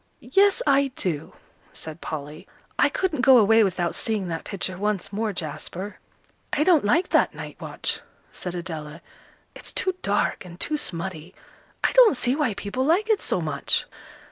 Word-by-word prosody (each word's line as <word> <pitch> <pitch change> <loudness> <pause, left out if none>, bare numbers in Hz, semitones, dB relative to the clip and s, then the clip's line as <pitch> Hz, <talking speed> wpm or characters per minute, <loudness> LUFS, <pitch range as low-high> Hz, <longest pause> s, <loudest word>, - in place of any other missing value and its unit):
"Yes, 400 0 +4
I 275 -1 +3
do," 160 -5 -2 0.4
said 160 +1 -9
Polly. 150 0 -6 0.3
"I - - +5
couldn't 345 -8 -1
go 260 -1 +7
away 225 0 +6
without 175 -3 0
seeing 210 -5 -2
that 165 -1 -4
picture 185 -1 -3
once 200 0 -2
more, 215 +1 -1
Jasper." 180 +3 -5 0.5
"I 300 - +2
don't 340 -3 +4
like 325 - +2
that - - +3
'Night - - -8
Watch,'" - - -3 0.3
said 180 -1 -5
Adela, 160 -2 -6 0.5
"it's - - -9
too 375 - 0
dark 205 0 0
and 175 -1 -12
too 310 - +1
smutty. 175 - -4 0.5
I - - +3
don't 485 - +6
see 250 +1 +2
why 285 -9 0
people 210 +7 -3
like 370 +10 +2
it 425 - +2
so - - 0
much." - - 0
205 Hz, 165 wpm, -24 LUFS, 175-280 Hz, 0.5 s, go